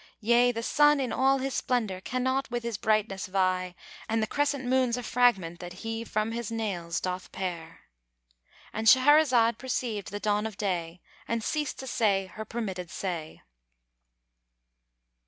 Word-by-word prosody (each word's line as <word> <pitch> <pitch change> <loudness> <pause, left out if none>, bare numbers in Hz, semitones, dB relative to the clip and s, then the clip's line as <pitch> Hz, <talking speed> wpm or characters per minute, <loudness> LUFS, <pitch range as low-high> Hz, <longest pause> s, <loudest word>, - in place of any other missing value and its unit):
Yea, 240 +3 +4
the 230 -1 -4
sun 295 +3 +4
in 260 -3 -1
all 270 +1 +3
his 270 0 -3
splendour 215 -7 -1
cannot 260 +4 -1
with 240 0 -3
his 235 -2 -3
brightness 210 -2 0
vie 185 -1 0 0.3
And 225 +1 +1
the 220 - +1
crescent 285 +2 -1
moon's 250 -1 +2
a 245 - -5
fragment 205 -9 +2
that 175 0 -7
he 225 0 -3
from 215 0 -1
his 230 -1 -4
nails 185 -7 -2
doth 185 0 -4
pare." 170 -3 -5 0.9
—And 220 +1 -2
Shahrazad 255 -3 +5
perceived 240 -6 -3
the 205 - -5
dawn 210 0 0
of 215 -3 -10
day 175 -4 -3 0.3
and 230 -1 -1
ceased 300 +3 -2
to - - -7
say 205 -6 +1
her 220 - -6
permitted 195 -6 -4
say. 170 -5 -5
225 Hz, 155 wpm, -28 LUFS, 190-250 Hz, 0.9 s, Shahrazad